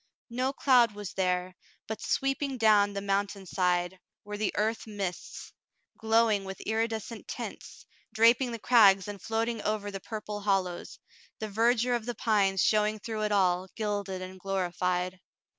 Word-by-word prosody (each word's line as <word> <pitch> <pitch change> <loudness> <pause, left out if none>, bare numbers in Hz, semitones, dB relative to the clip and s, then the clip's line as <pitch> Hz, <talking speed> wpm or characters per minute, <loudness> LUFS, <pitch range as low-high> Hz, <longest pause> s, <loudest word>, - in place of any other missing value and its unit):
No 255 +3 0
cloud 250 -5 +4
was 205 -2 -7
there, 180 -1 -1 0.3
but 220 - -6
sweeping 270 0 -1
down 210 -3 +4
the 200 - -3
mountain 200 0 -1
side 180 0 0 0.3
were 210 0 -5
the 205 -1 -1
earth 220 +2 -1
mists, 195 -4 -6 0.4
glowing 220 -2 +2
with 190 0 -7
iridescent 225 0 -3
tints, - - -8 0.3
draping 235 +3 +4
the 230 - -4
crags 205 -5 +5
and 205 -2 -7
floating 225 0 -2
over 205 -1 -2
the 195 - -5
purple 210 0 -6
hollows, 190 -3 -1 0.4
the 220 - -4
verdure 235 +3 +2
of 235 -1 -4
the 240 - -3
pines 200 -4 +2
showing 215 0 +2
through 215 0 -5
it 210 0 0
all, 185 -2 +2
gilded 205 -4 -3
and 185 0 -9
glorified. 180 -1 -1
210 Hz, 150 wpm, -29 LUFS, 190-225 Hz, 0.4 s, crags